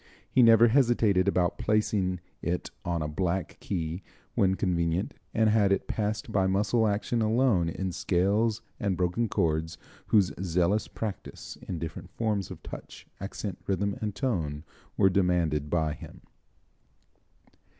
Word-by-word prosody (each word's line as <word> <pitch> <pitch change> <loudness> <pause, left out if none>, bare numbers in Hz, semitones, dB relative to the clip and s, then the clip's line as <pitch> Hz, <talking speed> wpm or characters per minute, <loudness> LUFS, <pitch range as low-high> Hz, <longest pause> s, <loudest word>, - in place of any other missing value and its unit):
He 130 - +3
never 115 0 +7
hesitated 115 -7 +3
about 90 -3 +1
placing 100 -4 +1 0.2
it 85 +2 -2
on 85 -2 -1
a - - -2
black 90 +4 -2
key 85 -1 -3 0.3
when 95 -1 +3
convenient, 85 0 0 0.2
and 110 -1 +2
had 105 -3 +3
it 100 - +1
passed 110 +1 -2
by 95 -3 +2
muscle 105 +4 +2
action 105 +3 0
alone 110 -6 +2
in 95 +2 -3
scales 100 +6 +1 0.2
and 100 -4 0
broken 90 +6 0
chords 80 -3 0 0.3
whose 100 -4 +4
zealous 90 +3 +1
practice 110 -3 -6
in 90 - -3
different 80 0 -6
forms 105 -4 -1
of - - -10
touch, - - -9
accent, 100 -1 -5
rhythm 100 +1 0
and 105 -2 -3
tone 80 - -2 0.3
were 95 - +5
demanded 90 -6 +1
by 80 -2 +1
him. - - -11
95 Hz, 140 wpm, -28 LUFS, 85-110 Hz, 0.3 s, never